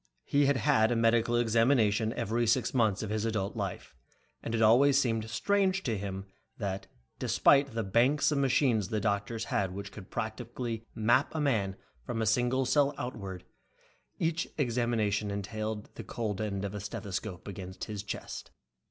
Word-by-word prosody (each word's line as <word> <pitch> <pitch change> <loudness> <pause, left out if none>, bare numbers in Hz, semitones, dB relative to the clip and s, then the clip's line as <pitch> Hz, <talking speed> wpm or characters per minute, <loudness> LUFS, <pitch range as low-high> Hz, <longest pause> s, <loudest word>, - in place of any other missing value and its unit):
He 140 0 +3
had 140 -1 +3
had 130 -6 +3
a - - +2
medical 115 +1 +3
examination 115 -2 +3
every 115 0 0
six 120 +2 +2
months 110 -5 +2
of 105 - -4
his 110 0 -1
adult 110 -3 -1
life, - - -5 0.5
and 115 - -3
it 115 - 0
always 135 +5 +6
seemed 115 -4 0
strange 190 - +1
to 115 -4 0
him 95 -1 -5 0.3
that, 100 -3 -3 0.3
despite 140 -4 +3
the 115 - 0
banks 125 +10 +3
of 145 - +1
machines 125 -6 +2
the 110 0 -1
doctor 100 +2 -1
had 100 -4 -1
which 100 0 -6
could 95 -2 -11
practically 115 +1 -4
map 120 +8 +2
a - - 0
man 110 -10 +1 0.3
from 115 - -3
a 110 - +1
single 125 +4 +2
cell 145 +2 +3
outward, 100 -7 -5 0.7
each 165 0 0
examination 115 -6 0
always 100 - -2
entailed 110 +1 -4
the - - -8
cold 110 -3 -3
end 100 -2 -2
of 100 - -4
a 105 - -4
stethoscope 100 -1 -5
against 95 -1 -7
his 105 -2 -4
chest. 105 - -6
115 Hz, 170 wpm, -30 LUFS, 105-125 Hz, 0.7 s, always